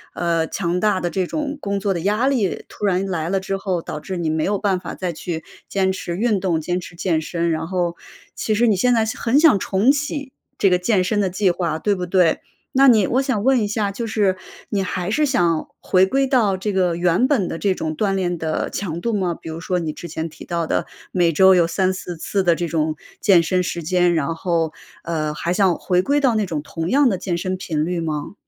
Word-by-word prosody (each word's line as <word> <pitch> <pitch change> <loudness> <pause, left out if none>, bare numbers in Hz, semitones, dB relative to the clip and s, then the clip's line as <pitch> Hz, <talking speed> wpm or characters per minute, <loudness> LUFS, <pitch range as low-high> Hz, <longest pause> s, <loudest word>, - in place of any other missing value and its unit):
呃， 165 -2 0
强 180 -1 -1
大 205 -2 +1
的 175 - -1
这 185 -1 -1
种 295 -1 -3
工 200 -6 -2
作 195 0 0
的 170 - -3
压 210 +8 +1
力 225 -9 0
突 210 - -5
然 190 0 +1
来 165 -3 -2
了 190 +1 0
之 195 0 -2
后， 185 -3 -2
导 150 - -6
致 185 +4 -6
你 170 -3 -1
没 155 0 0
有 205 0 +1
办 190 -2 0
法 - - -7
再 180 -2 -3
去 160 0 -5 0.2
坚 190 -1 +1
持 175 -2 -4
运 215 -1 +1
动， 170 -4 0
坚 180 +3 -1
持 175 -1 -10
健 170 -2 0
身。 170 +1 -1
然 160 +1 -2
后， 175 -2 -1 0.4
其 215 - -1
实 240 +3 +3
你 210 -4 +3
现 245 +5 +3
在 225 -1 +3
想 220 - -5
很 240 +4 +2
想 295 - +6
重 200 +9 +3
启 285 -1 -3 0.3
这 195 - +4
个 180 - +4
健 185 0 +1
身 205 +3 0
的 190 - +1
计 185 0 +2
划， 170 -3 -2
对 205 +3 +1
不 180 -1 -3
对？ 180 -2 +3 0.4
那 275 +1 +6
你 220 -6 +6
我 260 +3 +1
想 245 -6 -1
问 265 -1 +4
一 205 - 0
下， 205 -1 -1
就 230 +3 -4
是 205 -4 +1 0.3
你 200 -2 0
还 185 +1 -3
是 300 +5 +2
想 170 - +1
回 185 0 +3
归 270 +5 +2
到 230 -8 +2
这 205 +2 -2
个 180 -3 +1
原 175 +8 +2
本 240 -11 +1
的 165 - -4
这 195 -2 +1
种 155 -1 -3
锻 195 -2 +1
炼 175 -2 -1
的 160 -1 -2
强 170 -4 -3
度 235 -1 -1
吗？ 180 -4 0
比 160 - -9
如 160 +1 -5
说 180 +2 -1
你 160 -2 -2
之 170 - -8
前 160 +1 -4
提 155 - -12
到 170 -1 -2
的 - - -1 0.3
每 175 -2 +2
周 190 +4 +6
有 170 -2 +4
3-4 185 0 -1
次 195 +4 -1
的 170 -2 +3
这 170 +1 -2
种 155 -1 0 0.2
健 185 -6 +5
身 180 +2 +1
时 175 -2 -3
间， 175 +1 +2
然 160 +1 0
后， 165 -2 -1 0.3
呃， 155 -2 -2
还 170 +3 -2
想 185 -3 +3
回 180 -1 +1
归 285 +7 +1
到 260 -5 +3
那 215 -2 +1
种 160 -5 -3
同 165 +2 -4
样 275 0 +4
的 190 - -1
健 175 -2 -2
身 185 +1 -2
频 160 -5 -2
率 175 0 -2
吗？ 155 +1 -3
185 Hz, 260 characters per minute, -21 LUFS, 170-205 Hz, 0.4 s, 想